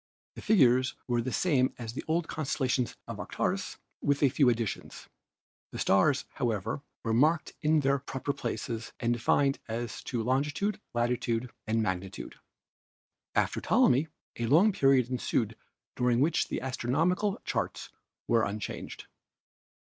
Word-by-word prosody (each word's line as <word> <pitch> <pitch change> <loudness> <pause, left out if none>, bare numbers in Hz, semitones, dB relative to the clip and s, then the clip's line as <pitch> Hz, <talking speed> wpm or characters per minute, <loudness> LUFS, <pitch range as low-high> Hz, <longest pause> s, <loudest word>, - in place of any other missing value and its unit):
The - - -9
figures 130 - +4
were 120 -1 +1
the 130 +2 -3
same 135 -7 +2
as 115 -2 -6
the - - -5
old 165 +1 0
constellations 130 -4 -1
of - - -6
Aratus - - -2 0.2
with 145 +1 +1
a 140 - +6
few 130 0 +4
additions. 115 -3 -3 0.6
The - - -7
stars, 130 +9 +3
however, 115 -1 -2 0.2
were 115 - 0
marked 155 +7 +2
in 155 -1 +3
their 140 0 +2
proper 135 +1 -3
places 115 -3 -4
and 120 -1 +1
defined 135 +4 +2
as 115 -1 -4
to 120 -2 -2
latitude, 145 - 0
longitude 120 0 0 0.2
and 110 0 +1
magnitude. 95 -1 -4 1.0
"After - - +1
Ptolemy 135 +6 +3 0.3
a 120 - 0
long 170 - +5
period 135 - +4
ensued 125 - -1 0.4
during 125 -1 +2
which 155 +5 +2
the - - -3
astronomical 165 - 0
charts - - -3 0.4
were 115 -2 +3
unchanged. 105 0 -5
130 Hz, 135 wpm, -29 LUFS, 115-145 Hz, 1.0 s, a